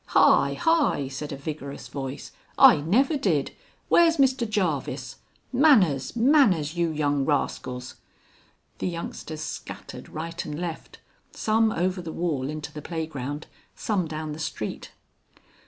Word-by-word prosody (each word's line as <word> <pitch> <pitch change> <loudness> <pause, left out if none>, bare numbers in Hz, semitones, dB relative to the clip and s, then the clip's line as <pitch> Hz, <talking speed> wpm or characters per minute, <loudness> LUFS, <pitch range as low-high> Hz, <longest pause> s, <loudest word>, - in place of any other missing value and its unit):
"Hi, - - +5
hi!" 325 - +2
said 145 +2 -6
a 140 - -5
vigorous 140 -1 -6
voice. 135 -1 -6 0.3
"I - - +8
never 225 - +2
did! 170 - 0 0.4
Where's 335 -1 +5
Mr 260 -4 +2
Jarvis? 180 -10 -2 0.4
Manners, 215 - +4
manners! 225 - +4
you 170 -1 +1
young 145 -2 0
rascals." 130 -3 -2 0.8
The - - -1
youngsters 165 -2 -5
scattered 155 - -7
right 165 +2 -5
and 150 0 -6
left, 170 -2 -6 0.4
some 220 0 +2
over 180 0 -1
the 165 -2 -6
wall 150 -7 -2
into 155 -1 -6
the 150 - -7
playground, 150 -3 -5 0.3
some 195 -6 -1
down 155 0 -5
the 150 - -7
street. 150 -8 -5
160 Hz, 130 wpm, -26 LUFS, 145-210 Hz, 0.8 s, I